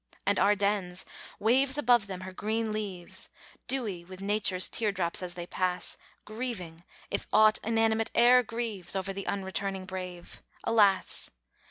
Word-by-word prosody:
And 200 0 +2
Ardennes 200 -2 +1 0.3
waves 260 +5 +3
above 240 -6 +4
them 185 -2 -6
her 185 0 -7
green 220 +3 -1
leaves, 195 -5 -3 0.4
Dewy 215 -10 -2
with 185 +1 -11
Nature's 195 -2 +1
tear 215 -3 0
drops, 180 -3 -1
as 180 -1 -5
they 175 -1 -5
pass, 180 0 -1 0.3
Grieving, 210 -8 -5 0.3
if - - -2
aught 215 0 +6
inanimate 225 0 +2
e'er 250 +1 +7
grieves, 230 -6 -3
Over 195 0 -2
the 195 0 -6
unreturning 195 -1 -2
brave, 185 -2 -7 0.2
alas! 205 -4 +3
200 Hz, 140 wpm, -29 LUFS, 185-225 Hz, 0.4 s, e'er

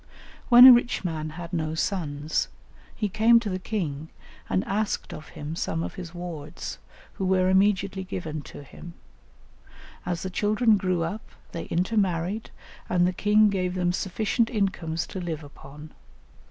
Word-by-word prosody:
When 245 0 +10
a 260 - +12
rich 240 -4 +1
man 155 -2 -3
had 170 +3 -8
no 160 -2 -1
sons, 155 -4 -1 0.5
he 210 - -1
came 225 +4 +5
to 220 -4 -4
the 185 - -2
king 160 -8 -4 0.4
and 95 0 +1
asked 210 +1 -2
of 155 - -10
him 150 +2 -5
some 165 0 -2
of - - -5
his 180 -3 -8
wards, 170 -3 -7 0.3
who 190 - -3
were 185 0 +3
immediately 190 0 +2
given 160 -5 -5
to 145 - -10
him. 170 +4 -12 1.1
As 175 -1 -3
the 190 - -4
children 215 +3 +3
grew 185 -3 0
up 200 +7 -4 0.3
they 165 - -5
intermarried, 185 +1 -1 0.4
and 175 -1 +3
the 180 - +1
king 210 +2 +4
gave 185 -2 -1
them 180 -1 +1
sufficient 215 +5 0
incomes 180 -7 -1
to 190 - -6
live 160 -3 -4
upon. 145 +1 -12
180 Hz, 155 wpm, -26 LUFS, 160-205 Hz, 1.1 s, a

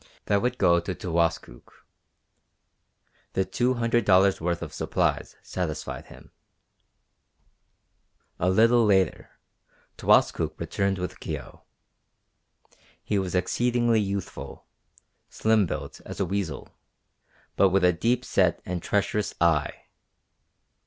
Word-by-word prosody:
That 100 -1 +2
would 125 +1 -1
go 85 -2 +4
to 90 +1 -5
Towaskook. 85 -8 -3 1.5
The 95 - +1
two 125 +5 0
hundred 120 -1 +1
dollars' 95 -1 +4
worth 85 0 -1
of 75 -2 -8
supplies - - -1
satisfied 80 -4 -5
him. - - -15 2.1
A 90 - +2
little 115 +5 +4
later 95 -5 +1 0.7
Towaskook - - +2
returned 100 -1 -1
with 90 0 -5
Kio. - - -7 1.4
He 105 - 0
was 95 -1 -3
exceedingly 120 +3 +1
youthful, 100 -2 -5 0.6
slim 110 -3 +2
built - - -6
as - - -9
a 95 - +1
weazel, 95 -2 -4 0.9
but 100 - +4
with 95 0 +2
a 90 - +4
deep 120 +8 0
set - - +2
and 90 -1 -3
treacherous 105 +2 -1
eye. 80 -4 +1
95 Hz, 110 wpm, -26 LUFS, 90-110 Hz, 2.1 s, go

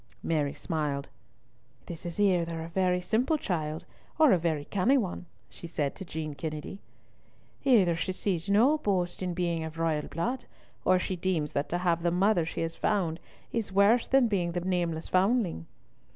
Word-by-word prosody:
Mary 150 -3 0
smiled. 145 -3 -2 0.8
"This 170 0 -7
is 170 +3 -6
either 170 -5 +2
a 165 - -7
very 180 0 +1
simple 240 - +1
child 160 - -3 0.3
or 310 -4 +6
a - - +5
very 160 -3 -1
canny 225 +8 +2
one," 185 -6 -3 0.2
she 170 - -10
said 150 -4 -2
to - - -8
Jean 155 -3 -5
Kennedy. 155 +5 -6 0.8
"Either 200 -11 +4
she 170 +3 -2
sees 185 -1 -2
no 250 +10 +4
boast 185 -9 -1
in 180 -2 -2
being 170 -2 -1
of 160 0 -7
royal 160 -2 0
blood, 240 - -3 0.4
or 185 - +5
she 185 +1 -2
deems 170 -4 -1
that 140 - -2
to 175 - 0
have 175 -2 +1
the 170 - +2
mother 180 -1 +2
she - - -4
has 165 0 -2
found 175 -6 0 0.3
is 225 -4 -2
worse 200 +5 +4
than 270 0 +4
the 235 - +2
being 175 -5 0
the 175 - -1
nameless 175 -3 -1
foundling." 185 - +1
175 Hz, 180 wpm, -29 LUFS, 165-200 Hz, 0.8 s, or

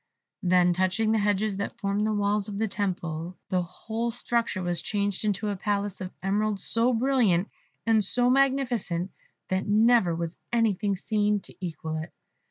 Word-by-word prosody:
Then 180 -1 +4
touching 185 +5 +1
the 220 - +3
hedges 205 0 +1
that 200 - -4
formed 200 +2 0
the - - +1
walls 205 -1 +1
of 205 -2 -5
the 220 +1 +1
temple, 180 -4 -3
the 185 -1 +2
whole 220 +6 -4
structure 235 -4 -1
was 175 -1 -1
changed 205 -2 -1
into 210 0 0
a 205 - -1
palace 200 0 -2
of 185 - -4
emeralds 205 +1 0
so 230 +2 +2
brilliant 230 -7 +2 0.4
and 225 -2 +4
so 245 +5 +1
magnificent, 250 -9 +1 0.4
that 190 +2 0
never 215 -4 +4
was 170 0 -4
anything 210 -4 +1
seen 210 +1 +1
to - - -9
equal 160 -2 -4
it. 160 +1 -6
205 Hz, 165 wpm, -27 LUFS, 185-220 Hz, 0.4 s, Then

